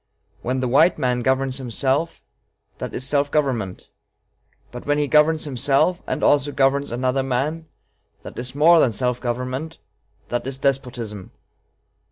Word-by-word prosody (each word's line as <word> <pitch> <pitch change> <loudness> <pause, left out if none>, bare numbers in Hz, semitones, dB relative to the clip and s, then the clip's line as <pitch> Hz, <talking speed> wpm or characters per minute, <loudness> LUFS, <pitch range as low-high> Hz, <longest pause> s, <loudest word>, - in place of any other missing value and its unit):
When 130 +2 -2
the 130 - 0
white 150 +8 +4
man 125 -4 0
governs 130 +1 0
himself, 135 +5 -1 0.6
that - - -5
is 130 - -3
self 145 0 +1
government; 125 -11 -1 0.8
but 125 - -8
when 145 0 +2
he 145 -1 +1
governs 155 +2 +3
himself 140 +5 +1
and - - -2
also 145 0 +3
governs 140 0 +1
another 130 +2 0
man, 140 +5 -2 0.6
that - - -8
is 125 +2 -5
more 165 +3 +6
than 120 -7 +3
self 125 +2 -1
government 130 +6 -4 0.5
that 120 +1 -2
is 135 -1 -4
despotism.... 125 -7 -3
135 Hz, 145 wpm, -22 LUFS, 125-145 Hz, 0.8 s, more